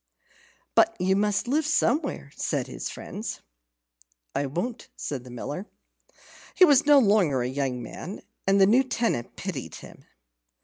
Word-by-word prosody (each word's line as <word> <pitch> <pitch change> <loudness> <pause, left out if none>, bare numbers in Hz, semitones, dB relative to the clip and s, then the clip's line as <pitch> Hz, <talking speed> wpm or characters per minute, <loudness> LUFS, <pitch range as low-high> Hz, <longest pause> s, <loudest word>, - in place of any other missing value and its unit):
"But - - +4
you 190 +1 +2
must 205 +2 +1
live 300 +5 +2
somewhere," 285 - 0
said - - -1
his - - -6
friends. - - -6 0.9
"I 140 - -1
won't," 180 - -4
said 135 -4 -5
the 125 - -12
Miller. 145 - -6 0.9
He 370 - +8
was 290 -3 +4
no 295 -1 +8
longer 200 - +3
a - - -1
young 130 -2 -2
man, 180 - -8 0.2
and 195 +1 +4
the 195 - +7
new 230 +7 +5
tenant 230 - -2
pitied 145 - -5
him. - - -13
195 Hz, 145 wpm, -26 LUFS, -, 0.9 s, He